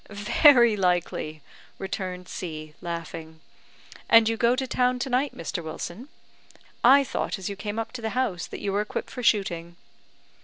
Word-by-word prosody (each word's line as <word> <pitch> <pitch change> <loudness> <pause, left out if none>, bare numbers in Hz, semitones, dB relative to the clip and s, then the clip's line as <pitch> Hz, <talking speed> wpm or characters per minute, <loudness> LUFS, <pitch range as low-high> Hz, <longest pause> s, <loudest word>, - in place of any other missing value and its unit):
"Very 235 +3 +5
likely," 175 -5 -1 0.3
returned 185 -1 -5
C, 155 -5 -6
laughing. 165 -1 -6 0.7
"And 230 -1 +7
you 225 - +1
go 235 +2 +3
to 265 0 -2
town 250 0 +1
to 255 +1 -3
night, 260 +3 0
Mr. 165 +1 -4
Wilson? 175 - -7 0.7
I 275 +3 +7
thought 255 - -3
as 190 0 -5
you 200 - -5
came 205 +2 -5
up 225 - -3
to 255 - -7
the 220 - -2
house 205 -10 -1
that - - -8
you 200 - -2
were 205 - +2
equipped 210 - -5
for 250 - -6
shooting." 175 -7 0
205 Hz, 165 wpm, -26 LUFS, 170-240 Hz, 0.7 s, And